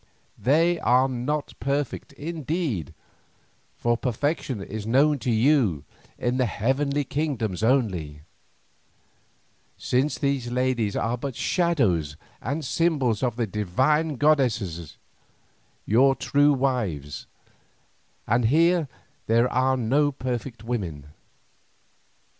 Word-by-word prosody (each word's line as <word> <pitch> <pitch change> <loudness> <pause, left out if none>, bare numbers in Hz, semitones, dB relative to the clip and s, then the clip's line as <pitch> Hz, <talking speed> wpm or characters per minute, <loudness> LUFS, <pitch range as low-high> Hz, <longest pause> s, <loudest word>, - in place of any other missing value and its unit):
They 165 +6 +3
are 125 +3 +3
not 135 +4 -3
perfect 140 0 -2
indeed, 150 - -3 0.8
for 120 0 +1
perfection 130 +1 -2
is 105 +2 -6
known 140 +5 +3
to 125 - -3
you 115 - +2 0.3
in 125 +1 -1
the 130 -2 +2
heavenly 140 +7 0
kingdoms 130 - -2
only, 95 - 0 1.5
since 130 +4 0
these 140 -4 -1
ladies 125 -4 0
are 115 +2 -1
but 135 -1 -4
shadows 110 - +1 0.2
and 145 +5 -3
symbols 140 -8 +1
of 125 -4 0
the 120 -1 0
divine 130 - 0
goddesses 120 - 0 0.9
your 135 +5 +4
true 145 +2 +3
wives, 105 - -2 1.0
and 120 +1 +2
here 165 +5 +3 0.4
there 115 +2 +4
are 130 +1 +2
no 140 +5 +2
perfect 125 -2 -5
women. 90 -12 -4
125 Hz, 100 wpm, -25 LUFS, 110-145 Hz, 1.5 s, your